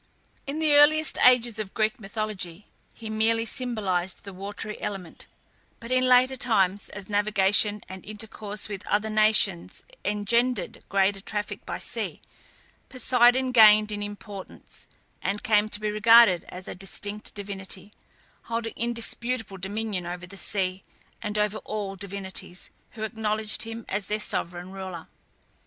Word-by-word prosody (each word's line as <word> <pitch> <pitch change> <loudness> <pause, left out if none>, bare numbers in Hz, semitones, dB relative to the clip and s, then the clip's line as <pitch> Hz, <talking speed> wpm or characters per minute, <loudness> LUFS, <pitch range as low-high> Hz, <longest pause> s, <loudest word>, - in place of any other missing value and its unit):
In 280 +2 -3
the 310 -2 +3
earliest 305 +2 +6
ages 240 -3 +5
of 205 -3 -5
Greek 215 +1 0
mythology, 200 -3 -4 0.3
he 225 - -9
merely 225 +1 +1
symbolized 200 -8 -1
the 195 - -9
watery 205 +3 -6
element; 185 -5 -6 0.5
but 230 +1 -8
in 255 0 +3
later 255 +1 +5
times, 200 -6 +1
as 205 -2 -7
navigation 205 0 +2
and 190 -1 -9
intercourse 210 -1 -5
with 200 -2 -6
other 215 +1 0
nations 215 -4 +2 0.2
engendered 235 +5 0
greater 195 0 +2
traffic 210 +1 -4
by - - -3
sea, - - -3 0.7
Poseidon 255 0 +3
gained 215 -2 +7
in 205 0 -3
importance, 205 -1 -9 0.3
and 200 +2 -2
came 215 -1 +3
to 210 - -3
be 215 0 -1
regarded 215 -3 +6
as 180 +1 -8
a - - -5
distinct 205 +2 -5
divinity, 200 0 -7 0.5
holding 230 0 -3
indisputable 235 -2 -1
dominion 195 -1 -3
over 175 0 -5
the 190 +2 -12
sea, 190 -1 -1 0.4
and 210 0 -3
over 210 0 +1
all 205 -2 -4
sea - - -18
divinities, 190 -2 -6 0.2
who 220 - -6
acknowledged 215 -1 -1
him 225 0 -5
as 195 0 -1
their 210 +1 -1
sovereign 175 -3 -2
ruler. 190 -4 -7
210 Hz, 140 wpm, -26 LUFS, 195-225 Hz, 0.7 s, gained